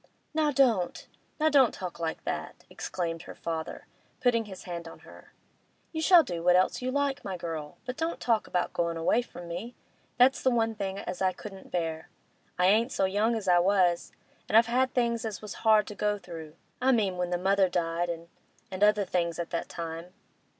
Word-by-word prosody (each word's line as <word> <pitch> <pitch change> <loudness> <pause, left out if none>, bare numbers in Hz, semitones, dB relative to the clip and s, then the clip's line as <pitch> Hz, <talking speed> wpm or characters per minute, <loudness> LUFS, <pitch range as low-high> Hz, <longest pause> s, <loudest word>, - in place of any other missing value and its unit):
'Now 310 -1 +2
don't—now 265 - 0
don't 270 -5 +4
talk 180 -3 -6
like 165 -1 -3
that!' - - -5
exclaimed 165 -2 -4
her - - -10
father, 165 -1 -5 0.3
putting 235 -3 +2
his 190 -3 -10
hand 170 -1 -6
on - - -12
her. - - -15 0.6
'You 315 - -3
shall 345 0 +7
do 175 - -4
what 180 +1 +4
else 185 +6 +2
you 255 - -1
like, 280 +1 0
my 190 -2 -4
girl, 160 -3 -6
but 250 0 -5
don't 325 +1 -2
talk 230 -3 +1
about 180 -1 -1
goin' 170 -1 -1
away 165 +8 +2
from 175 -7 -10
me. 185 +9 -6 0.4
That's 255 +2 +5
the 260 - +3
one 225 -2 +1
thing 195 -2 -4
as 185 -2 -5
I 185 -1 +2
couldn't 195 +1 -10
bear. 165 -2 -3 0.5
I 180 - +3
ain't 220 +6 +4
so 195 - +1
young 210 +5 +1
as 215 -4 -4
I 175 -1 +6
was, 180 -2 +2 0.4
and 215 - +5
I've 230 - +7
had 255 +2 +1
things 235 -2 +1
as 220 -4 -4
was 210 -2 -7
hard 215 -1 +5
to - - -7
go 210 0 0
through—I 170 +8 -4
mean 200 -7 +1
when 180 0 -1
the 175 - 0
mother 190 +1 +3
died 170 0 -1
and—and 175 +4 -7
other 210 -1 +4
things 170 -2 -1
at 170 - -4
that 170 - -3
time. 165 +1 -6
190 Hz, 195 wpm, -28 LUFS, 175-235 Hz, 0.6 s, shall